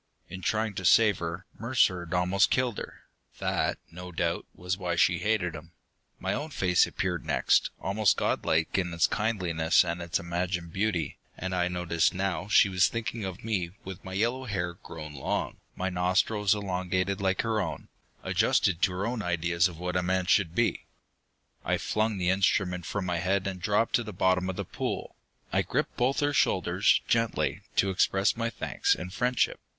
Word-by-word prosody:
In 95 +1 -7
trying 110 +2 0
to 95 - -5
save 105 +2 +5
her, 85 +2 -5
Mercer 115 -6 +2
had 85 +2 -4
almost 90 +2 +3
killed 125 -4 0
her. - - -9 0.4
That, - - 0
no 90 +1 -8
doubt, 85 0 -1
was 90 +1 -2
why 90 -3 -2
she 85 +1 +3
hated 105 -6 0
him. 80 +2 -10 0.4
My - - -2
own 150 +2 -3
face 90 - +3
appeared 90 -2 -2
next, - - +2
almost 100 +3 +2
godlike 80 +4 +1
in 90 -2 -2
its 85 - +4
kindliness 90 -8 +2
and 85 0 -3
its 85 -1 -1
imagined 85 0 -3
beauty, 100 -4 -1 0.2
and 95 +1 -4
I 90 -1 +1
noticed 90 0 0
now 95 -2 -1
that 105 - -11
she 100 - +7
was 95 -2 +3
thinking 115 -1 -4
of 95 -2 -6
me 95 -6 -2
with 95 0 -8
my 95 - -7
yellow 120 +6 0
hair 85 -6 -2
grown 75 -3 -9
long, 65 - -2 0.2
my 95 +1 -2
nostrils 95 +3 +2
elongated 95 0 -1
like 95 -1 +1
her 110 -2 0
own - - -5 0.4
adjusted 90 -2 +2
to 90 - +3
her 95 +3 -2
own 115 0 -2
ideas 85 -1 +1
of 85 -3 -10
what 90 +1 -4
a 90 - +2
man 95 +1 0
should 95 -4 +2
be. 120 -1 0 0.8
I - - +1
flung 110 -1 0
the 90 -1 +1
instrument 90 -3 +1
from 105 -3 -2
my 90 -2 -1
head 95 +2 0
and 95 -2 -4
dropped 105 +4 +1
to 120 - -3
the 105 - -7
bottom 95 0 +1
of 95 - -3
the - - -4
pool. - - -4 0.4
I - - +3
gripped - - -2
both 130 +4 +1
her 145 0 +1
shoulders, 90 -5 +3
gently, 115 -1 0
to 95 - +3
express 95 +2 +2
my 115 0 -1
thanks - - 0
and 90 0 -7
friendship. 125 +3 +1
95 Hz, 185 wpm, -28 LUFS, 90-105 Hz, 0.8 s, she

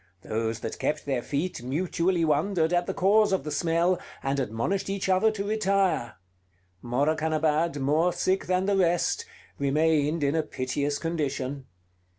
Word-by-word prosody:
Those 115 0 -2
that - - -5
kept 150 0 -1
their 135 -4 -1
feet 150 +5 -3
mutually 170 +6 0
wondered 160 +2 +1
at 175 0 +1
the - - -1
cause 210 +2 +4
of 190 -6 +1
the 150 - -5
smell, 170 +4 +1 0.2
and 135 +1 0
admonished 130 - -2
each 195 -1 -2
other 190 +3 +4
to 200 -2 -4
retire. 195 - +1 0.7
Morakanabad, 155 +4 +1
more 155 +6 +2
sick 190 +2 0
than 185 +1 +1
the 200 0 +2
rest, 175 -2 +1 0.3
remained 150 +2 +2
in 140 0 +2
a 160 - +3
piteous 145 0 -2
condition. 140 -5 -3
160 Hz, 150 wpm, -27 LUFS, 140-185 Hz, 0.7 s, cause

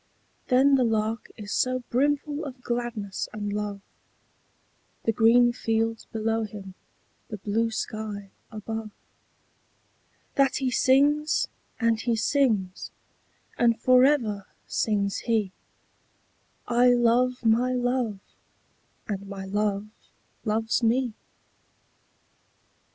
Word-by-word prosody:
But 270 +2 +5
the 255 - +3
Lark 220 0 -1
is 205 -2 -7
so 255 0 0
brimful 290 +3 0
of 260 -3 -8
gladness 235 -5 -3
and 205 -1 -3
love, 205 -1 -3 1.2
The 225 - +2
green 240 +2 +5
fields 225 -1 -1
below 225 0 0
him, 200 -3 -7 0.5
the 215 - -6
blue 215 +3 0
sky 215 -3 -5 0.2
above, 220 0 -5 1.5
That 275 -1 +3
he 265 -2 0
sings, 290 +5 +3 0.3
and 230 -2 +2
he 235 0 0
sings; 220 -6 0 0.7
and 230 -1 +3
for 255 0 +5
ever 230 -9 +2 0.2
sings 200 -2 0
he 220 -5 0 1.2
'I 245 +1 +5
love 245 +1 +2
my 235 +3 +3
Love, 245 -4 0 0.9
and 200 -1 -4
my 195 -1 -6
Love 205 +1 -1 0.6
loves 220 +1 0
me!' 240 +1 +1
225 Hz, 100 wpm, -26 LUFS, 210-250 Hz, 1.5 s, But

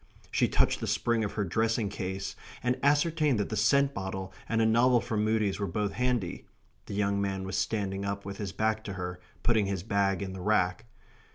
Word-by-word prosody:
She - - +3
touched - - +2
the - - -3
spring 115 -1 +1
of 105 - -3
her 105 - 0
dressing 110 +3 +1
case, 95 -1 -4 0.3
and 125 +1 +1
ascertained 145 -2 +3
that 105 - -1
the 110 - -2
scent 140 +6 +3
bottle 95 -1 -4 0.2
and 115 - +1
a 110 - +4
novel 120 +2 +5
from 110 -2 -1
Mudie's 105 -2 +1
were 100 - -1
both 100 +3 -1
handy 125 -7 -1 0.4
(the 100 - -5
young 100 -1 +1
man 95 -1 -1
was 95 - -4
standing 100 -3 -1
up 100 0 -3
with 100 0 -6
his 100 -3 -4
back 110 +1 0
to 100 - -4
her, 90 -1 -5 0.2
putting 110 -4 +3
his 95 -3 -2
bag 100 -2 +1
in 95 -1 -5
the 95 - -7
rack). 105 +1 +1
105 Hz, 205 wpm, -29 LUFS, 95-115 Hz, 0.4 s, novel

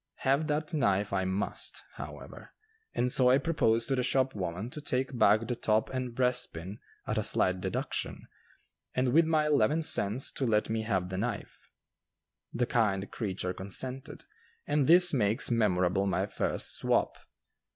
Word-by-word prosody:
Have 140 +4 +2
that 155 +2 -2
knife 100 -9 +1
I 95 -1 0
must, 95 +2 -3
however, - - -10 0.4
and 125 +1 +1
so 125 0 +5
I 130 - +5
proposed 115 -8 +1
to 135 - +2
the 125 - 0
shop 130 +1 +1
woman 95 +4 -4
to 150 - -7
take 130 -2 -2
back 110 -1 +4
the 120 - -2
top 110 -1 0
and 125 -2 -4
breastpin 115 -7 -1 0.3
at - - -1
a - - -1
slight 95 0 0
deduction, - - -3 0.7
and 130 0 +1
with 165 +1 +5
my 155 -1 +2
eleven 150 +2 +2
cents 115 -4 +2
to 130 - -2
let 110 -1 +1
me 110 0 -1
have 95 -5 -1
the 95 0 -4
knife. 115 0 -5 0.8
The 120 +1 0
kind 100 -5 0
creature 95 -4 -3
consented, 130 +10 -4 0.4
and 145 -2 +1
this 180 +1 +7
makes 110 -2 +2
memorable 95 -4 +1
my 95 - 0
first - - -3
"swap." - - 0
120 Hz, 160 wpm, -29 LUFS, 100-135 Hz, 0.8 s, this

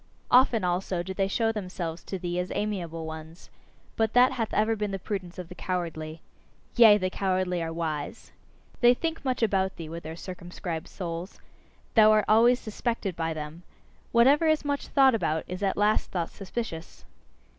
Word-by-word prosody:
Often, 245 -4 +5
also, 180 0 -1
do 190 +2 -5
they 195 0 0
show 225 +3 +1
themselves 180 -5 -5
to 190 - -4
thee 175 -1 -3
as 180 +1 -3
amiable 175 -6 -3
ones. 160 +1 -9 0.4
But 220 -1 +1
that 250 +2 +6
hath 235 -4 -2
ever 220 +1 +2
been 210 -1 -2
the 195 - -3
prudence 185 -2 -5
of 180 -2 -6
the 180 - -9
cowardly. 165 -4 -4 0.5
Yea! 220 -3 +8
the 185 -2 -2
cowardly 185 -2 0
are 165 0 -3
wise! 160 -3 -4 0.5
They 240 0 +6
think 325 +3 -3
much 255 -3 -1
about 190 -3 +1
thee 160 -2 -7
with 165 +1 -6
their 160 0 -7
circumscribed 175 -2 -6
souls 175 0 -6 0.5
thou 215 -2 +7
art 215 -1 +3
always 235 +3 +5
suspected 215 -3 -3
by 165 -1 -2
them! 155 +2 -7 0.5
Whatever 275 +7 +5
is 310 -1 +2
much 285 -1 -2
thought 270 -2 +5
about 160 -8 0
is 180 +2 -6
at 195 -1 0
last 210 +1 +2
thought 170 -3 -3
suspicious. 195 -4 -6
190 Hz, 175 wpm, -27 LUFS, 170-225 Hz, 0.5 s, Yea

